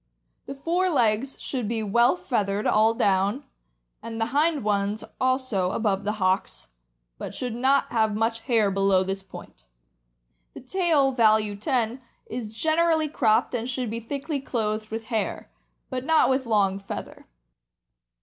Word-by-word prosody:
The 275 - -6
fore 345 +6 0
legs 240 -3 +1
should 250 -6 -3
be 225 0 -2
well 235 - +3
feathered 205 - -1
all 220 +2 +3
down, 200 +3 +1 0.6
and 225 0 -6
the 225 - +1
hind 300 -2 +2
ones 205 0 0 0.2
also, 255 -8 0
above 205 -3 0
the 210 - 0
hocks, 190 - -1 0.5
but - - -6
should 250 -2 -3
not 260 +4 +2
have 220 -2 +1
much 225 +1 0
hair 225 -4 +1
below 195 -1 +3
this 195 +1 -3
point. 190 - -13 0.9
The - - -7
tail 295 -1 +2
(value 215 -4 +3
10) 240 +2 -1 0.2
is 225 -2 -6
generally 320 +2 +2
cropped, 225 -7 +2
and 240 0 -2
should 250 -3 -3
be 230 - -3
thickly 280 +5 -4
clothed 215 -4 -3
with 225 +1 -4
hair, 220 - -2 0.4
but 255 -1 -3
not 320 -1 +3
with 260 -1 0
long 200 -3 +2
feather. 195 - -8
225 Hz, 150 wpm, -25 LUFS, 210-265 Hz, 0.9 s, well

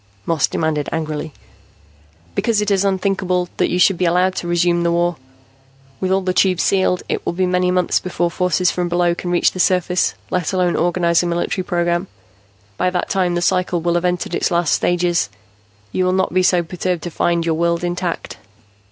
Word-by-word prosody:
Moss 165 -4 +1
demanded 155 -2 -1
angrily. 155 -1 -3 1.0
"Because 220 - +1
it 210 0 0
is 195 -1 +2
unthinkable 190 -2 0
that - - +1
you 180 - 0
should 180 0 +3
be 180 - +2
allowed 180 +2 +2
to 175 - -3
resume 175 0 +2
the 170 0 +1
war. 175 0 +1 0.8
With 185 - -1
all 190 0 +2
the 185 -1 -1
Tubes 185 -2 +2
sealed, 185 -2 +1
it - - -2
will - - -2
be 185 +2 0
many 180 0 +1
months 180 -1 +1
before 175 -1 -2
forces 180 0 +1
from 175 -1 -2
below 175 0 +2
can 175 +1 -5
reach 175 0 +3
the 185 - -8
surface, 180 0 +1 0.2
let 180 0 -1
alone 180 -2 +1
organize 170 0 +2
a 175 - -2
military 175 +2 -1
program. 175 +1 -1 0.7
By 180 - +1
that 180 -1 -2
time 180 -3 +1
the 175 - -1
cycle 180 -1 +1
will 170 +1 0
have 175 0 0
entered 180 -1 -1
its - - 0
last 170 -3 +1
stages. 175 - +1 0.6
You 185 - 0
will 185 - +1
not 190 -1 0
be 185 - +3
so 180 -1 +3
perturbed 180 0 -3
to 175 - -5
find 170 +1 0
your 165 - +1
world 170 +1 0
intact. 175 0 -3
175 Hz, 195 wpm, -19 LUFS, 170-185 Hz, 1.0 s, should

